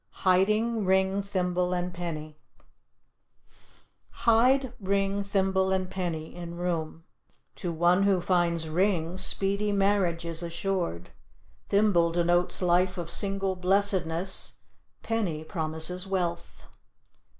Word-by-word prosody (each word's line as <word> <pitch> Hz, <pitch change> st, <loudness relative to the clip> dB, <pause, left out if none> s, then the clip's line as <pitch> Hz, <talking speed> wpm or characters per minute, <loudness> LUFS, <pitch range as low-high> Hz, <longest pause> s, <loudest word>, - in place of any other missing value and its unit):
HIDING 215 Hz, +5 st, +2 dB
RING, 190 Hz, +1 st, +2 dB
THIMBLE 180 Hz, -2 st, -1 dB
AND 180 Hz, 0 st, -3 dB
PENNY 155 Hz, -3 st, -6 dB, 1.9 s
Hide 250 Hz, +3 st, +4 dB
ring, 195 Hz, 0 st, 0 dB
thimble 190 Hz, -1 st, +1 dB
and 185 Hz, -1 st, -1 dB
penny 165 Hz, -4 st, -4 dB
in 170 Hz, -1 st, -7 dB
room. 165 Hz, -2 st, -3 dB, 0.5 s
To 175 Hz, -, -3 dB
one 175 Hz, +3 st, +3 dB
who 195 Hz, -2 st, +3 dB
finds 170 Hz, -2 st, +1 dB
ring, 175 Hz, +1 st, 0 dB
speedy 200 Hz, +2 st, +2 dB
marriage 195 Hz, -4 st, +1 dB
is 165 Hz, 0 st, -1 dB
assured; 170 Hz, -, -3 dB, 0.6 s
thimble 200 Hz, -5 st, +3 dB
denotes 175 Hz, +2 st, +1 dB
life 180 Hz, +1 st, +2 dB
of 170 Hz, -1 st, -5 dB
single 195 Hz, -1 st, -1 dB
blessedness; 185 Hz, -1 st, 0 dB, 0.5 s
penny 195 Hz, -9 st, -2 dB
promises 160 Hz, +3 st, -2 dB
wealth. 175 Hz, -3 st, -3 dB
180 Hz, 105 wpm, -27 LUFS, 170-195 Hz, 1.9 s, Hide